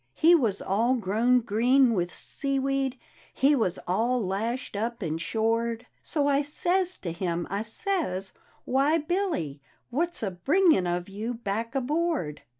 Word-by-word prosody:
He 330 +2 +6
was 230 - +2
all 230 +6 +2
grown 235 +3 +2
green 240 +3 +3
with 175 -3 -1
seaweed 275 -1 -2 0.4
He 280 +3 +4
was 220 -9 +1
all 230 +8 +1
lashed 225 +5 -2
up 230 +2 -3
and 160 0 -2
shored; 230 +4 0 0.2
So 295 -3 -1
I 280 0 +3
says 355 +5 0
to 170 - -2
him, 170 0 -2
I 200 +1 -1
says, 225 - -3 0.2
' - - -34
Why, 275 +5 +3
Billy 315 - -2
I - - -35 0.2
What's 340 +2 -1
a 200 - -1
bringin' 290 - +3
of 175 0 -2
you 215 +5 -4
back 230 +2 -3
aboard? 285 - -1
235 Hz, 150 wpm, -27 LUFS, 195-280 Hz, 0.4 s, He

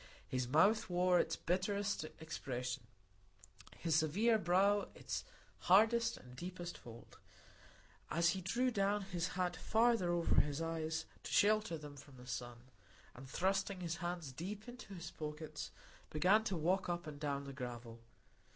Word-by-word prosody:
His 125 -1 -1
mouth 190 - +4
wore 180 0 +4
its 165 - +1
bitterest 195 0 0
expression, 130 -5 -4 1.0
his 165 -3 +1
severe 205 +9 +3
brow 200 +3 +3
its - - -4 0.5
hardest 225 +5 +5
and 125 0 -13
deepest 175 +3 -6
fold, 115 -1 -12 0.9
as 170 +3 +3
he 190 +2 -1
drew 245 +8 +1
down 200 -1 +1
his 180 -2 -2
hat 180 -1 +1
farther 225 -5 +3
over 170 -1 +4
his 145 0 -3
eyes 160 -1 -2 0.2
to - - -7
shelter 210 -5 +3
them 150 -1 -9
from 140 -1 -13
the 125 - -12
sun, 120 -1 -5 0.5
and 130 +1 -11
thrusting 195 +3 0
his 170 -1 -2
hands 175 -5 -3
deep 195 - -6
into 240 -5 -9
his 170 -2 -7
pockets, 150 0 -6 0.4
began 185 +8 +4
to 195 -5 -1
walk 180 +4 +1
up 175 -1 -2
and 150 -2 -7
down 140 -2 -1
the 140 0 -7
gravel. 120 -3 -6
175 Hz, 150 wpm, -37 LUFS, 145-195 Hz, 1.0 s, hardest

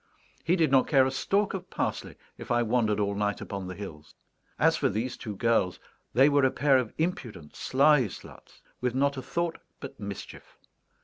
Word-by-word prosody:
He 170 - +2
did 160 -6 +2
not 135 -1 +4
care 135 -4 +5
a 130 - 0
stalk 195 +9 0
of 185 -1 -6
parsley - - -3 0.2
if - - -10
I 120 0 +2
wandered 110 -2 +1
all 100 -1 0
night 105 0 -1
upon 100 -2 -6
the 90 - -6
hills! 80 -7 -10 0.4
As - - +4
for - - +1
these 120 +5 -2
two 105 -3 -7
girls, 115 -4 +1 0.3
they 135 +4 +5
were 145 -1 +3
a 130 - +5
pair 135 0 +3
of 120 -4 -3
impudent 120 - -4
sly 135 -2 +3
sluts, - - -13 0.2
with 125 0 -1
not 140 +1 +2
a - - -3
thought 170 +4 -2 0.2
but 135 0 -9
mischief. 100 -2 -8
125 Hz, 190 wpm, -28 LUFS, 105-140 Hz, 0.4 s, care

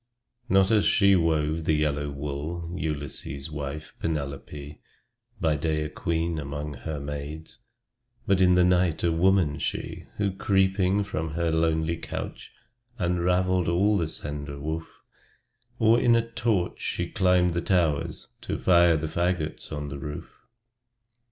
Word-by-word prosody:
Not 95 0 +4
as 105 -3 +4
she 100 -1 +5
wove 80 -2 +1
the 80 - +3
yellow 75 -1 0
wool, 75 +4 -5
Ulysses' 70 -2 -4
wife, 75 +1 -5
Penelope; 75 -1 -5 0.6
By 80 -2 +2
day 75 +1 -1
a 75 - -4
queen 85 0 -1
among 75 +1 -5
her 70 +4 -5
maids, 75 +5 -7 0.7
But 100 -4 +2
in 90 -1 +5
the 90 - +5
night 90 -2 +2
a 85 - +3
woman, 85 -3 +2
she, - - -4
Who, 100 -1 +1
creeping 95 0 +2
from 80 -5 -4
her 85 -1 0
lonely 80 0 +1
couch, - - -6 0.5
Unraveled 90 0 +1
all 95 +5 +3
the 85 -5 +1
slender 75 -2 -5
woof; 80 +2 -5 0.7
Or, 115 +1 +5
with 120 -1 +5
a 115 - +3
torch, 110 -6 0
she 90 - -2
climbed 90 -2 +3
the 85 - 0
towers, 85 -5 0
To - - -3
fire 85 -2 +5
the 80 - -3
fagots 85 0 -2
on 75 -1 -4
the 70 0 -6
roof! 75 +1 -8
80 Hz, 140 wpm, -26 LUFS, 75-90 Hz, 0.7 s, she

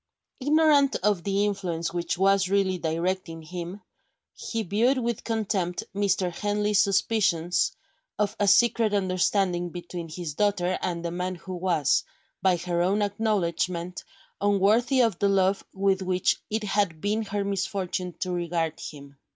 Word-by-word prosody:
Ignorant 290 0 +4
of 205 -4 +2
the 200 +1 +1
influence 175 -5 -2
which 175 0 -2
was 195 0 +3
really 190 -2 +1
directing 165 0 -2
him, 175 +4 -7 0.5
he 230 -1 -4
viewed 225 +8 +2
with 235 -3 -2
contempt 200 -6 -1
Mr. 195 -2 +1
Henley's 205 +2 +1
suspicions 190 -4 +1 0.5
of 210 0 0
a 205 - +2
secret 215 +2 +4
understanding 185 -2 +1
between 175 -1 -7
his 165 -2 -5
daughter 185 0 +1
and 170 -2 -3
the 170 - -2
man 180 +1 -3
who 185 +2 -8
was, 170 -6 +1 0.4
by 185 -1 +3
her 175 0 -1
own 195 +4 +2
acknowledgment, 180 -4 -1 0.4
unworthy 210 +6 +3
of 225 -7 0
the 200 - +3
love 195 0 +2
with 195 0 +1
which 185 -1 +1
it 220 0 -1
had 200 -5 0
been 210 +5 0
her 205 -1 -2
misfortune 190 -2 -2
to 185 - -1
regard 170 -2 -2
him. 140 -4 -10
190 Hz, 145 wpm, -26 LUFS, 175-205 Hz, 0.5 s, Ignorant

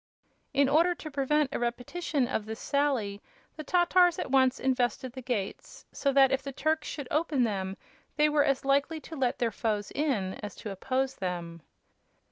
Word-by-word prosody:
In 280 0 +3
order 335 +5 +3
to 310 -2 -8
prevent 280 +1 +1
a - - -1
repetition 245 +4 -1
of 215 -2 -2
this 220 +1 -5
sally 260 -9 0 0.3
the 310 - -6
Tatars 355 +1 +4
at - - -4
once 260 -1 +4
invested 255 0 0
the 260 - -7
gates, 230 -6 -4
so 280 - 0
that 270 -1 +5
if 270 0 +1
the 275 +1 -6
Turks 310 +3 -1
should 285 -4 -5
open 300 -4 +1
them 195 -4 -2 0.4
they 300 - +4
were 295 -1 +3
as 275 -2 0
likely 280 +4 +2
to 320 - -9
let 260 -4 0
their 235 -2 0
foes 210 -3 -2
in 225 -11 -1
as 210 - -6
to 210 - -7
oppose 260 +7 -1
them. 170 -3 -4
270 Hz, 180 wpm, -29 LUFS, 225-295 Hz, 0.4 s, that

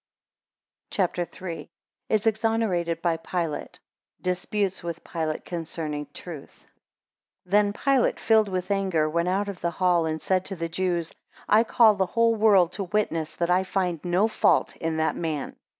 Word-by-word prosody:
CHAPTER 180 -2 0
III. 180 -3 -6
1 - - -10 0.4
Is 215 0 +1
exonerated 215 -7 0
by 170 -2 +2
Pilate. 165 -2 -4
11 - - -33 0.4
Disputes 190 +2 -1
with 170 -1 -6
Pilate 160 -2 -3
concerning 160 -3 -4
truth. 155 -2 -10 0.8
THEN 205 +2 +3
Pilate, 265 +4 +1
filled 220 -2 +3
with 185 +1 -3
anger, 190 -6 +1
went 170 +3 0
out 200 +2 0
of 200 -3 -6
the 170 - +1
hall, 175 -1 +2
and 160 0 -2
said 185 +1 +1
to 195 - -5
the 165 -1 -4
Jews, 175 -1 -1 0.3
I 220 +2 +5
call 230 -1 +5
the 190 -2 0
whole 230 +3 +3
world 205 -6 +4
to 195 +1 -4
witness 170 -5 -1
that 170 0 0
I 185 +1 +3
find 180 -4 -2
no 180 +4 +2
fault 220 - +2
in 165 -1 -2
that 160 0 +1
man. 155 -4 -3
180 Hz, 165 wpm, -26 LUFS, 165-205 Hz, 0.8 s, I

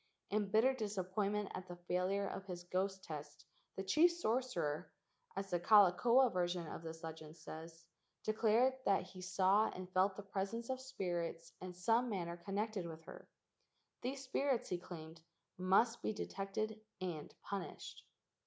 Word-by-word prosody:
In 205 0 +2
bitter 225 +6 +5
dis¬ 215 -5 -3
appointment 200 +2 0
at 185 - -5
the 175 - -6
failure 180 +3 0
of 195 - -5
his 175 -2 -5
ghost 190 +2 -1
test 150 -3 -7 0.3
the 190 - -3
chief 305 - +6
sorcerer, 220 - -1 0.4
as 195 0 -3
the 175 - +2
Kalakaua 220 +7 +6
version 175 -1 0
of 155 - -6
this 165 0 -7
legend 160 0 -7
says, 165 +1 -9 0.4
"declared 225 +4 +4
that 200 - +4
he 185 0 -10
saw 195 +3 +4
and 185 0 -6
felt 190 +1 +4
the 205 - -7
presence 200 +5 -2
of 260 0 -3
spirits 175 -9 -3
in 180 -1 -6
some 225 +7 +3
manner 170 -5 -2
connected 200 +1 -2
with 160 -1 -8
her." - - -11 0.7
These 265 +2 -3
spirits, 270 -1 +1
he 180 - -1
claimed, 160 -2 -9 0.3
must 195 +6 +3
be - - 0
detected 210 +2 -3 0.2
and 175 -5 -4
punished. 200 -1 -5
190 Hz, 155 wpm, -38 LUFS, 175-215 Hz, 0.7 s, chief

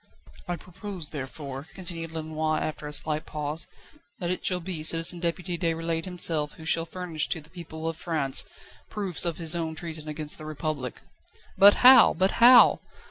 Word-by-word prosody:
"I 175 - -2
propose, 180 -2 -8
therefore," 140 0 -7
continued 170 -3 -7
Lenoir 155 -1 -2
after 155 -1 -5
a - - -6
slight 155 +1 0
pause, 150 +1 -2 0.5
"that 175 -1 -3
it 180 - -3
shall 180 -1 +1
be 170 -2 -5
Citizen 165 +2 +4
Deputy 170 +1 -3
Déroulède 165 -1 -2
himself 165 -5 -1
who 160 - -13
shall 165 0 +1
furnish 170 -3 -3
to 165 - -2
the 155 +1 -16
people 165 -2 -8
of 165 -1 -3
France 155 -6 -1 0.5
proofs 195 -5 0
of 170 -2 -2
his 165 -1 +2
own 160 -2 -3
treason 160 -1 -6
against 150 0 -4
the 155 - -9
Republic." 155 -4 -5 0.5
"But 200 +1 +8
how? 260 +1 +8
But 190 +1 +2
how?" 245 +1 +8
165 Hz, 170 wpm, -26 LUFS, 155-175 Hz, 0.5 s, But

